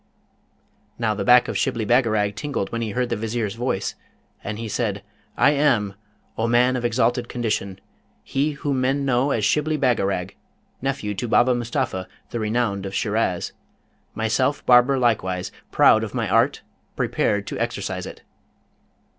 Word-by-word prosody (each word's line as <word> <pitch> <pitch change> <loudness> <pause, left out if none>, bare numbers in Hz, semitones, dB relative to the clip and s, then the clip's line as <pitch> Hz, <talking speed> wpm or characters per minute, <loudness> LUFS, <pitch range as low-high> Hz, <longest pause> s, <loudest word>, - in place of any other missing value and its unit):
Now, 110 -2 0
the 105 - -3
back 125 0 +6
of - - -4
Shibli 115 -2 -1
Bagarag 110 -4 +2
tingled 135 -5 -3
when 115 - -3
he 115 - -2
heard 125 +4 -1
the - - 0
Vizier's 110 -1 -2
voice, 115 -4 -2 0.5
and 105 0 -4
he 115 0 -5
said, 105 -3 -2 0.3
'I 145 - +5
am, 130 -9 +2 0.5
O 115 - +1
man 125 +2 +3
of 125 - -2
exalted 120 0 +1
condition, 105 -5 -2 0.4
he 145 +3 -1
whom 140 -2 -2
men 135 +2 +1
know 130 +1 +2
as 110 -6 +1
Shibli 155 +6 +1
Bagarag, 100 -8 0 0.5
nephew 130 -6 -2
to 105 +5 -4
Baba 125 +2 +4
Mustapha, 115 -6 -2 0.2
the 120 - -3
renowned 105 -3 -1
of 95 - -6
Shiraz; - - 0 0.6
myself 130 +6 0
barber 125 +2 +5
likewise, 95 -7 0 0.2
proud - - +5
of - - -6
my - - -1
art, - - +2 0.3
prepared 105 -1 0
to - - -5
exercise - - -3
it.' - - -11
120 Hz, 155 wpm, -23 LUFS, 105-130 Hz, 0.6 s, back